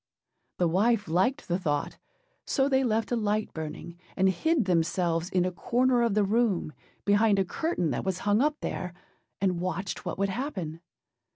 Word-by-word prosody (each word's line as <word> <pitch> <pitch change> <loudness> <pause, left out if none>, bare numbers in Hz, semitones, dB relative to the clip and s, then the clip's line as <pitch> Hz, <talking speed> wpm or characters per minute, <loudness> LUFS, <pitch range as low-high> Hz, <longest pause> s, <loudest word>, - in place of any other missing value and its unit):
â - - -53
The 175 - +2
wife 205 +5 +2
liked 245 - +1
the 175 +1 0
thought; 145 -5 -2 0.4
so 270 0 +1
they 265 -1 +2
left 225 -2 0
a - - +2
light 215 -1 -1
burning, 160 +2 -7 0.2
and 190 0 +4
hid 280 - +1
themselves 170 -1 +1
in 180 -1 +1
a 185 - 0
corner 245 +6 +2
of 230 -4 +1
the 210 - +4
room, 200 -6 +1 0.3
behind 205 0 +4
a 195 - +2
curtain 180 - -1
that 120 - -2
was 190 -2 -1
hung 205 +3 +3
up 300 +1 0
there, 180 -1 -4 0.5
and 185 -3 0
watched 185 +1 -3
what - - -4
would 195 +1 +1
happen. 190 - -4
195 Hz, 180 wpm, -28 LUFS, 175-235 Hz, 0.5 s, and